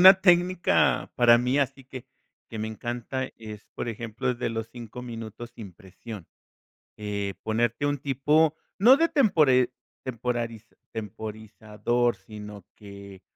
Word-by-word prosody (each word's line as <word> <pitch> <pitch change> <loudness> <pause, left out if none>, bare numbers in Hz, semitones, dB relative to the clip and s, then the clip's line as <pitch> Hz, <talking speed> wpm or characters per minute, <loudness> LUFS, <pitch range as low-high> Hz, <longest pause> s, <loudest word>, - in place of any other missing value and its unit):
Una 190 +1 +10
técnica 180 -1 +3
para 120 -1 +7
mí 125 +3 +1
así 135 -1 -1
que 130 -1 -9 0.5
que 110 - -6
me 110 - -2
encanta 120 +4 -4
es, 110 -1 -9
por - - -3
ejemplo, 115 0 -4
el 120 - -4
de - - -1
los 115 0 -4
5 120 0 -8
minutos 115 -1 -7
sin 100 -5 -9
presión. 95 +1 -10 0.7
Eh, 100 -2 -3
ponerte 115 +4 0
un 145 0 +1
tipo, 145 +3 +2 0.2
no 240 +7 +8
de 330 +3 +2
tempore 145 - +4 0.3
temporariz 120 -2 -3 0.3
temporarizador, 110 +2 -2
sino, 105 -2 -10
que 100 -2 -11
120 Hz, 135 wpm, -27 LUFS, 110-130 Hz, 0.7 s, Una